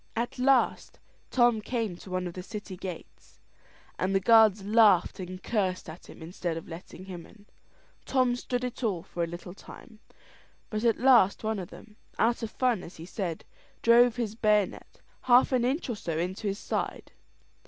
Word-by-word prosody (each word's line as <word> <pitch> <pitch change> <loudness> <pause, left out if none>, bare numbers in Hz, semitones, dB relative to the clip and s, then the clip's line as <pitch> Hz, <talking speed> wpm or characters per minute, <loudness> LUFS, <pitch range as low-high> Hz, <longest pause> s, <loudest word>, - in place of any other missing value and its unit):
At 240 +2 -3
last 260 -1 +2 0.3
Tom 240 -3 +3
came 225 -5 -2
to 190 - -13
one 185 0 -2
of 175 - -5
the 185 - -6
city 205 0 -8
gates, 175 - -10 0.6
and 190 +1 0
the - - +4
guards 215 -1 +5
laughed 210 -3 +4
and 185 0 -7
cursed 190 -5 -1
at 160 +2 -11
him - - -11
instead 170 0 -4
of 165 - -8
letting 170 +2 -10
him 180 -3 -9
in. 205 -2 -19 0.6
Tom 255 -2 +1
stood 245 0 -3
it 250 0 -5
all 190 -7 -1
for 170 - -4
a - - -1
little 175 +1 -8
time, 215 +3 -14 0.7
but 215 0 -2
at 230 -2 +3
last 240 -7 +4
one 220 -1 -1
of 180 - -7
them 215 -1 -14 0.2
out 235 +3 +2
of 225 - -3
fun, 245 -4 0
as 175 - -11
he 165 - -9
said 175 -3 -5 0.4
drove 235 0 +6
his 230 -4 -3
bayonet 210 -3 0 0.2
half 250 +1 +5
an 255 -2 +2
inch 265 +7 0
or 240 - -2
so 165 -6 -4
into 185 +5 -3
his 200 0 -2
side. - - -4
210 Hz, 185 wpm, -28 LUFS, 185-235 Hz, 0.7 s, drove